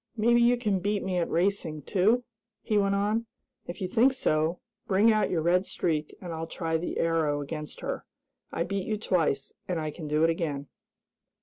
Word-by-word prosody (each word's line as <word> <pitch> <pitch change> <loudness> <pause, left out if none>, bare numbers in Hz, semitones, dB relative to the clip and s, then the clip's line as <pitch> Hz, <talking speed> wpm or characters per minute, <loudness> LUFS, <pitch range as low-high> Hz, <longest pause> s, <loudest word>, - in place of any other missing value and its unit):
"Maybe 235 +2 +4
you 240 +1 +5
can 210 -5 0
beat 205 +2 -1
me 185 -2 0
at 170 - -1
racing, 170 -4 0
too?" 215 - +2 0.4
he 215 - -1
went 200 -1 +3
on. 210 +3 0 0.4
"If 175 - -7
you 185 - 0
think 245 +8 +4
so, 160 -8 +1 0.3
bring 205 +4 +5
out 215 -1 +2
your 165 -3 0
Red 180 +2 +3
Streak 155 -3 -2
and 175 -3 -6
I'll 165 0 -4
try 165 -1 -2
the 170 - -4
Arrow 160 -3 +1
against 150 +1 -6
her. - - -3 0.5
I - - -1
beat 195 +1 -3
you 215 - 0
twice, 165 -9 0
and 180 -3 -1
I 155 -1 -3
can 155 0 -7
do 150 +1 +2
it 165 - +5
again!" 150 -5 -2
180 Hz, 195 wpm, -28 LUFS, 160-205 Hz, 0.5 s, you